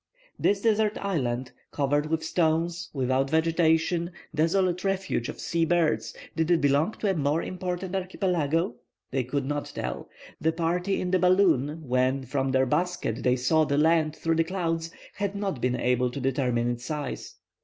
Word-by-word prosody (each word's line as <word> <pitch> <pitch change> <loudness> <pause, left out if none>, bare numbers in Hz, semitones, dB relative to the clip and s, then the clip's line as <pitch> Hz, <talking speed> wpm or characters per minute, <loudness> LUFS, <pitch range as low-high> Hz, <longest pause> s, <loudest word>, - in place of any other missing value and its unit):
This 200 0 +2
desert 215 -1 +2
isle, 130 -11 -1 0.3
covered 145 +1 0
with 160 0 -1
stones, 165 +1 0
without 130 0 0
vegetation, 165 +1 +2 0.2
desolate 180 +3 +1
refuge 190 -10 -1
of - - -7
sea 170 -1 0
birds, 165 -1 +1 0.2
did 160 0 0
it 175 -2 +4
belong 145 +8 +2
to 205 - 0
a - - +1
more 150 0 0
important 180 0 -4
archipelago? 175 - 0 0.3
They 130 0 0
could 135 +2 -2
not 145 +1 -3
tell. - - -4 0.3
The 160 +1 +1
party 175 +4 0
in 180 - -2
the 185 - +3
balloon, 165 -5 +2
when 130 +2 +1
from 135 +1 -1
their 130 0 +3
basket 155 -4 -1
they 125 0 +3
saw 155 +6 +3
the 140 -2 0
land 155 0 +3
through 165 -1 0
the 165 - +4
clouds, 165 -2 -2 0.2
had 200 0 -3
not 195 -10 -3
been 125 0 +1
able 125 0 +1
to 140 - -6
determine 125 -3 0
its 120 +1 -5
size. 150 -3 -5
160 Hz, 165 wpm, -27 LUFS, 135-180 Hz, 0.3 s, it